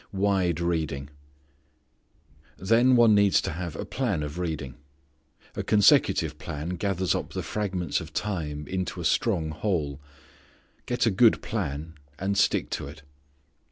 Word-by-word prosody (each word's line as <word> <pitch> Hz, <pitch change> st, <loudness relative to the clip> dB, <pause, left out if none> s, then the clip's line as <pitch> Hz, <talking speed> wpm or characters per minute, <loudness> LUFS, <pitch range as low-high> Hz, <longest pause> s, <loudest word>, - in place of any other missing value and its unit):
Wide 95 Hz, -4 st, +1 dB
Reading. 80 Hz, -5 st, -2 dB, 1.5 s
Then 115 Hz, +6 st, +4 dB
one 120 Hz, -2 st, +6 dB
needs 100 Hz, -1 st, +4 dB
to -, -, -3 dB
have 85 Hz, 0 st, -5 dB
a -, -, -5 dB
plan 105 Hz, -, -1 dB
of 75 Hz, +4 st, -6 dB
reading. 80 Hz, -7 st, -3 dB, 0.8 s
A -, -, -2 dB
consecutive 105 Hz, -2 st, +3 dB
plan 75 Hz, +3 st, -5 dB
gathers 95 Hz, -1 st, 0 dB
up -, -, -4 dB
the -, -, -3 dB
fragments 95 Hz, -6 st, -2 dB
of 80 Hz, 0 st, -9 dB
time 80 Hz, -7 st, -3 dB
into 95 Hz, -1 st, -3 dB
a -, -, -4 dB
strong 80 Hz, -2 st, +1 dB
whole. 80 Hz, -7 st, -2 dB, 0.9 s
Get 120 Hz, -1 st, +1 dB
a 115 Hz, -, +3 dB
good 110 Hz, +4 st, +4 dB
plan, 75 Hz, +3 st, -4 dB, 0.2 s
and 100 Hz, +2 st, -1 dB
stick 100 Hz, -, +1 dB
to -, -, -3 dB
it. 70 Hz, 0 st, -11 dB
90 Hz, 140 wpm, -26 LUFS, 75-100 Hz, 1.5 s, one